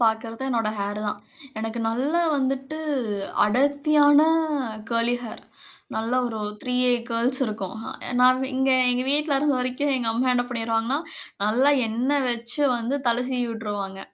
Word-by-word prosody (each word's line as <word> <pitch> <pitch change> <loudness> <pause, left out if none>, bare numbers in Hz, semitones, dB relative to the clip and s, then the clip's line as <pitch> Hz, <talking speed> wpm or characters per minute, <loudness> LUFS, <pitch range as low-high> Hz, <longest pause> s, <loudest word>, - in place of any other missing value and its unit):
பார்க்றது 225 +2 0
என்னோட 230 -4 0
ஹேர் 200 +1 -3
தான். 205 0 -3 0.4
எனக்கு 225 +1 -4
நல்ல 255 +7 -1 0.2
வந்துட்டு 270 +3 -2 0.7
அடர்த்தியான 290 +5 +4 0.6
கேர்லி 230 +1 +1
ஹேர். 220 - -8 0.5
நல்ல 225 +2 -2
ஒரு 225 -2 -5 0.2
3ஏ 250 -1 +2 0.2
கேர்ல்ஸ் 240 +3 +2
இருக்கும். 210 -2 -5 0.4
நான் 255 +1 +5
இங்க 265 +1 +2 0.2
எங்க 250 +1 0
வீட்ல 295 0 +1
இருந்த 290 0 +1
வரைக்கும் 255 +3 -1
எங்க 240 -3 -1
அம்மா 255 +3 +1
என்ன 245 0 +1
பண்ணிருவாங்கன்னா, 230 +2 -1 0.5
நல்லா 245 +7 +3 0.2
எண்ண 240 +5 -1 0.2
வச்சு 235 +4 -2 0.2
வந்து 235 +4 -2
தல 235 +1 +1
சீவியுட்ருவாங்க. 215 -6 -3
245 Hz, 130 wpm, -24 LUFS, 225-265 Hz, 0.7 s, நான்